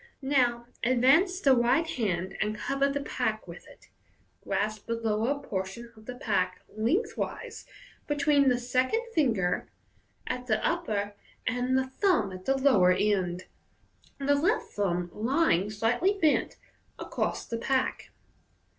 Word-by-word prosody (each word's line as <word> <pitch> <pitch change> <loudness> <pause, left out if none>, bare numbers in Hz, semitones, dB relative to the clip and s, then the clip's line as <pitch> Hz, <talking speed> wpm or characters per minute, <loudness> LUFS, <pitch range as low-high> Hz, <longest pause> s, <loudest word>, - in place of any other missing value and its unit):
Now 245 -4 +2 0.2
advance 270 - +4
the 275 -8 +5
right 245 +7 +3
hand, 190 - -2
and 215 0 -1
cover 275 +6 0
the 285 +1 -2
pack - - -2
with - - -11
it. - - -18 0.5
Grasp 215 0 -2
the 230 - 0
lower 230 +5 0
portion 220 0 -5
of 220 0 -17
the 250 - -5
pack 185 -6 -1
lengthways 245 - -2 0.4
between 290 -1 +3
the 250 - +2
second 255 - 0
finger 225 - +1 0.6
at 250 0 -4
the 215 -2 +2
upper 210 -13 -1 0.3
and 250 +1 +1
the 265 - +1
thumb 265 - +1
at 185 0 -9
the 270 0 +2
lower 215 -10 +5
end, 185 -2 0 0.7
the 280 +1 +2
left 340 +11 +1
thumb 180 -3 -1
lying, 225 - +1
slightly 240 - +1
bent, 310 -4 +2 0.4
across - - -3
the 230 - -4
pack. 260 +2 -1
245 Hz, 135 wpm, -28 LUFS, 210-280 Hz, 0.7 s, the